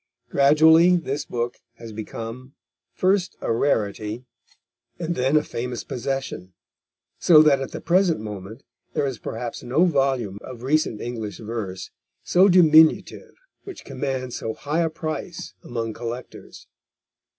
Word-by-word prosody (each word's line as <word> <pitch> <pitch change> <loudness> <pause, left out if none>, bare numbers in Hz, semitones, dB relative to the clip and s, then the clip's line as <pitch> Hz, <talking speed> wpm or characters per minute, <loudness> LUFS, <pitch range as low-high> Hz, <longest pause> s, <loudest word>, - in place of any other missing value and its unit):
Gradually 160 +5 +6
this 145 -5 -2
book 120 0 -3 0.2
has 115 -1 -10
become 115 +4 -7 0.4
first 185 0 0
a - - -1
rarity 110 -2 -1 0.7
and 170 0 -2
then 135 +1 +2
a 150 - +2
famous 125 -2 -5
possession, 130 -8 -4 0.7
so 155 -3 +7
that 140 -3 +4
at 135 - -4
the - - -7
present 175 - +2
moment 105 +2 -8 0.3
there - - 0
is 130 -5 -4
perhaps 115 +1 -5
no 130 +9 +2
volume 135 - 0
of 125 -2 -10
recent 140 -5 0
English 115 -4 -5
verse 105 -5 -6 0.3
so 185 +2 +5
diminutive 160 -3 +4 0.3
which 390 - -10
commands 130 -2 -4
so 110 -1 -4
high 150 +4 -1
a 165 - +1
price 160 +2 -6
among 115 -2 -4
collectors. 120 +2 -8
130 Hz, 130 wpm, -23 LUFS, 115-155 Hz, 0.7 s, so